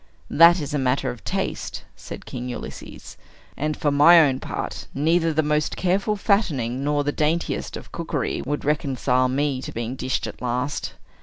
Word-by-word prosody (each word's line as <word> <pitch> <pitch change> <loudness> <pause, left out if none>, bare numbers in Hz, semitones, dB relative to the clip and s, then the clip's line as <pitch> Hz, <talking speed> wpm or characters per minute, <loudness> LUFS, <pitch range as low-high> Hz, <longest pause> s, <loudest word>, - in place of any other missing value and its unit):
"That 170 +3 +7
is 145 -1 -5
a 145 - +1
matter 130 0 0
of 120 - -11
taste," - - -3
said - - -9
King 125 0 -6
Ulysses, 120 - -8 0.4
"and, 150 +1 -2
for 145 - +1
my 150 +5 +7
own 135 -5 +3
part, - - -5
neither 165 +3 +2
the 155 0 +1
most 150 0 0
careful 195 +3 +1
fattening 145 - 0
nor 145 0 +1
the 145 - 0
daintiest 160 +3 -1
of - - -12
cookery - - -2
would 145 +2 -3
reconcile 130 -3 +1
me 135 0 0
to - - -6
being 120 +2 -4
dished 130 -1 -2
at - - -8
last. 125 +3 -2
145 Hz, 170 wpm, -23 LUFS, 130-160 Hz, 0.4 s, That